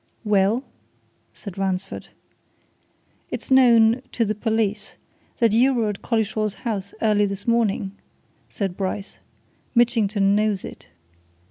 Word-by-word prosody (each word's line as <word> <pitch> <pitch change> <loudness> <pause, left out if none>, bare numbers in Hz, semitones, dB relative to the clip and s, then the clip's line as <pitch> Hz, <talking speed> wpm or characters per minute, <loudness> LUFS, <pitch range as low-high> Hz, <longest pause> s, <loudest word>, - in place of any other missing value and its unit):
"Well?" 210 +3 +2 0.7
said 195 -2 -7
Ransford. 190 0 -3 1.2
"It's - - -6
known 235 -2 +5
to 230 - +1
the 215 - 0
police 215 -1 -1 0.4
that 230 -3 +3
you 255 +5 +4
were 225 -3 +1
at 205 - -5
Collishaw's 215 -2 -1
house 205 -5 -4
early 210 -1 +3
this 200 +1 -6
morning," 220 -4 +1 0.6
said 195 -4 -3
Bryce. 195 +1 -4 0.6
"Mitchington 215 -4 +3
knows 210 -2 0
it." - - -11
215 Hz, 115 wpm, -23 LUFS, 200-230 Hz, 1.2 s, known